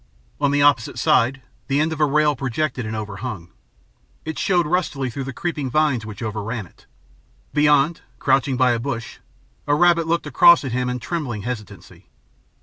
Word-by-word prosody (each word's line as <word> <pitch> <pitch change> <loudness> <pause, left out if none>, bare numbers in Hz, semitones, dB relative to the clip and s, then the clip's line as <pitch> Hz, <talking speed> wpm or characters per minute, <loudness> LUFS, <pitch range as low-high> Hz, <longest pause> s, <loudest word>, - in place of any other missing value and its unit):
On 145 -1 +2
the 145 0 +2
opposite 140 -6 +2
side, 130 +2 +2 0.2
the 140 +1 +1
end 155 +1 +1
of 160 - -7
a - - +6
rail 150 +1 +2
projected 130 -1 -2
and 110 - -4
overhung. 105 -3 -6 0.8
It 160 0 -5
showed 180 -3 +2
rustily 150 -6 -1
through 135 +3 -5
the 135 - -5
creeping 150 -2 -3
vines 135 -6 +1
which 105 +2 -8
overran 110 +1 -4
it. - - -23 0.7
Beyond, 150 +1 +3 0.2
crouching 135 -1 +1
by 125 0 +4
a 120 - 0
bush, 115 -3 -5 0.5
a 145 - +3
rabbit 170 0 +3
looked 170 0 0
across 160 +4 +6
at 130 - -3
him 125 +1 -1
in 125 - -2
trembling 125 - -4
hesitancy. 115 -4 -8
135 Hz, 170 wpm, -21 LUFS, 120-150 Hz, 0.8 s, a